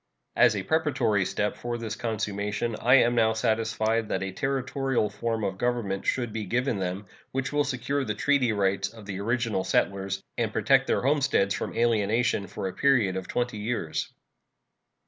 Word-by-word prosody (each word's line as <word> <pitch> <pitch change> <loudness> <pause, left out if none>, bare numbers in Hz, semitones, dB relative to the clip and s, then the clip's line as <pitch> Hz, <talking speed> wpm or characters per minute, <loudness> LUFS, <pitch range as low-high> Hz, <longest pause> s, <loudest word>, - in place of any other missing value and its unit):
As - - +5
a - - -2
preparatory 130 -11 +1
step 105 +2 -1
for 120 0 -4
this 110 -2 -4
consummation, 105 0 -2
I 125 +2 +6
am 120 -2 +5
now 110 -2 +3
satisfied 110 0 0
that 95 - -1
a 95 - -3
Territorial 135 -1 -1
form 110 +1 -2
of 95 -1 -2
government 115 -6 -1
should 120 -4 0
be 110 -2 -3
given 120 +2 0
them, 95 +2 -3 0.3
which 135 +2 -2
will 145 0 +3
secure 140 +1 -2
the 105 -4 -3
treaty 135 0 +2
rights 95 -1 0
of 110 -2 -13
the 100 -1 -5
original 115 -2 0
settlers 95 0 0 0.2
and - - 0
protect - - +3
their - - +1
homesteads 135 -8 +2
from - - -4
alienation 115 -2 +1
for 95 +1 -4
a 95 - -5
period 120 -9 +2
of 95 -1 -4
twenty 120 -3 -2
years. 105 -7 -2
110 Hz, 170 wpm, -27 LUFS, 100-125 Hz, 0.3 s, I